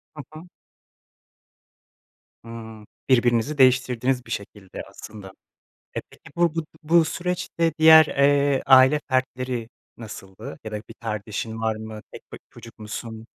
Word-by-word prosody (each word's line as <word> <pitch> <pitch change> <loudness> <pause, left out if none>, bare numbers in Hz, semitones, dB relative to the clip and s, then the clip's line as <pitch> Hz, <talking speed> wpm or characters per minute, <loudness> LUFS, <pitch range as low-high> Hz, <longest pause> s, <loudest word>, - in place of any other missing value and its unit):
Hı 150 - -8
hı. 155 +2 -10 2.0
Hıı. 110 -2 -10 0.2
Birbirinizi 120 +3 +2
değiştirdiniz 130 -1 +2
bir - - -12
şekilde 100 -2 -7
aslında. 105 -3 -11 0.7
E, - - 0
peki - - -17
bu 170 -2 +2
bu 165 - 0
b - - -9 0.2
bu 165 +1 +4
süreçte 170 -1 -2
diğer, 160 0 +9
eee, 140 0 +2
aile 130 +2 +6
fertleri 130 -3 -2 0.3
nasıldı? 110 +3 -10
Ya 110 - -7
da - - -2
bir 110 +2 -10
kardeşin 110 0 -5
var 110 -1 -1
mı? 110 0 -8
Tek - - -10
b - - -7
çocuk 115 -2 -14
musun? 110 +1 -7
125 Hz, 135 wpm, -23 LUFS, 110-145 Hz, 2.0 s, diğer